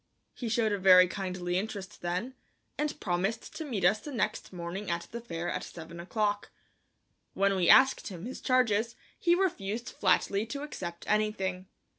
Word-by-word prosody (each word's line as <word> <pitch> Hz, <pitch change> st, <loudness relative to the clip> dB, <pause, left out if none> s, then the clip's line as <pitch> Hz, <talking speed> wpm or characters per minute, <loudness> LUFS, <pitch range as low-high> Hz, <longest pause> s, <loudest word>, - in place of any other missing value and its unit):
He 240 Hz, -, -4 dB
showed 220 Hz, -1 st, +2 dB
a 205 Hz, -, 0 dB
very 185 Hz, -1 st, +8 dB
kindly 185 Hz, -1 st, -2 dB
interest 205 Hz, -1 st, -6 dB
then, 180 Hz, +9 st, -2 dB, 0.4 s
and 300 Hz, 0 st, -2 dB
promised 195 Hz, +5 st, -2 dB
to 320 Hz, -, -4 dB
meet 225 Hz, -, -2 dB
us 210 Hz, +4 st, +4 dB
the 295 Hz, -, -8 dB
next 215 Hz, -4 st, -2 dB
morning 180 Hz, +3 st, -5 dB
at 170 Hz, 0 st, -2 dB
the 235 Hz, -, -5 dB
fair 170 Hz, -6 st, -5 dB
at -, -, -2 dB
seven 170 Hz, 0 st, -9 dB
o'clock. 205 Hz, +3 st, -1 dB, 0.9 s
When 195 Hz, 0 st, +3 dB
we 180 Hz, -2 st, +2 dB
asked 265 Hz, 0 st, +6 dB
him 180 Hz, -2 st, -7 dB
his 255 Hz, -, -6 dB
charges 235 Hz, -3 st, +2 dB, 0.2 s
he 345 Hz, 0 st, +4 dB
refused 235 Hz, -, -1 dB
flatly 200 Hz, +2 st, +1 dB
to 280 Hz, +4 st, -5 dB
accept 175 Hz, -, -6 dB
anything. 195 Hz, -3 st, 0 dB
205 Hz, 165 wpm, -30 LUFS, 180-230 Hz, 0.9 s, very